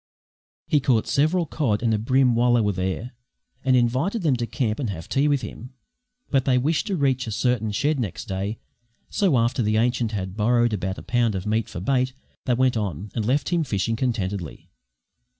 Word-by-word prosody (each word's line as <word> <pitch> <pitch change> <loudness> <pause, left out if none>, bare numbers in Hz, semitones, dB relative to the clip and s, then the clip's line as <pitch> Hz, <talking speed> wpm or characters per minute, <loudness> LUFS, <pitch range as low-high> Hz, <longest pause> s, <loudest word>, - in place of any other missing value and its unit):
He 150 - +2
caught 125 -5 +2
several 155 +5 +2
cod 125 -9 -1
and 115 -2 +2
a 105 - +1
bream 130 +2 +3
while 120 +1 +3
they 120 - +4
were 105 -1 +1
there, 95 +6 -3 0.5
and 130 -1 +3
invited 130 - +1
them 145 -5 +3
to 120 -1 -2
camp 110 -2 -1
and 125 -6 -2
have 80 -4 -6
tea 140 +2 +1
with 145 -3 +2
him. 125 +4 -9 0.6
But 135 -2 +2
they 130 -2 +3
wished 155 - 0
to 200 - 0
reach 130 -5 +1
a - - -3
certain 110 -1 0
shed 145 +7 0
next 105 -8 -4
day, 100 +3 -3 0.5
so 185 -10 +2
after 120 +2 +1
the 110 -1 +1
ancient 120 -1 +1
had 95 -3 -4
borrowed 120 +2 +2
about 95 -1 -2
a - - -9
pound 115 -2 +1
of 95 - -4
meat 110 +1 0
for 95 - -6
bait 130 +4 +1 0.3
they 125 - +2
went 130 0 +2
on, 100 -1 -4
and 110 - -1
left 135 +4 +1
him 170 -2 +1
fishing 115 -3 -1
contentedly. 100 - -3
120 Hz, 205 wpm, -24 LUFS, 105-130 Hz, 0.6 s, they